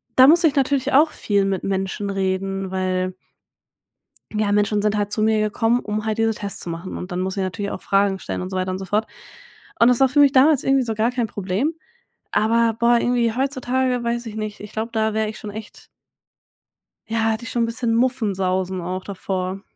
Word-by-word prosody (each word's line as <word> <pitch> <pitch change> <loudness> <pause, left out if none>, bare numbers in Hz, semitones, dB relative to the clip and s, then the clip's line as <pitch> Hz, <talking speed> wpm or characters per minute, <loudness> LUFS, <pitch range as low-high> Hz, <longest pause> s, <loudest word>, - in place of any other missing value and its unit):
da 260 +1 +8
musste 335 +2 +6
ich 295 - -1
natürlich 275 0 +1
auch 305 +3 +5
viel 200 -2 0
mit 195 -1 -2
Menschen 195 +1 -2
reden, 195 0 -2
weil 185 0 -1 1.2
ja, 210 -1 0
Menschen 210 0 +2
sind 210 0 +1
halt 205 0 -1
zu 215 - 0
mir 220 0 +3
gekommen, 225 +3 +1
um 210 +1 -3
halt 220 0 -1
diese 225 0 +2
Tests 200 -1 -3
zu - - -2
machen. 170 +3 -6
Und 180 +1 -7
dann 180 - -2
musste 190 +1 -2
ich - - 0
natürlich 200 +2 -3
auch - - -6
Fragen 195 -1 +1
stellen - - -5
und 185 - -5
so 185 - -4
weiter 185 0 -1
und 185 - -3
so 190 - -6
fort. 210 +4 0 0.7
Und 230 - +6
das 250 - +3
war 265 -1 +5
für 290 - +1
mich 285 -2 +6
damals 280 +1 +4
irgendwie 270 -1 +3
so 225 -2 -2
gar 220 +3 +1
kein 240 -3 -1
Problem. 205 - -2 0.6
Aber, 230 +1 +2
boah, 235 0 +4
irgendwie 240 -2 +1
heutzutage, 260 -1 -1
weiß 235 +1 -2
ich 215 - -7
nicht, 215 -1 -5
ich 210 0 -9
glaube, 225 +2 -3
da 220 -1 0
wäre 220 0 0
ich 215 - -6
schon 210 - -7
echt 215 0 -10 1.2
ja, 230 - -2
hätte 220 +2 -3
ich - - -6
schon 235 -1 +1
'n - - +2
bisschen 230 0 -1
Muffensausen 190 -7 0
auch 185 +2 -4
davor. 190 -1 -4
215 Hz, 215 wpm, -21 LUFS, 195-240 Hz, 1.2 s, da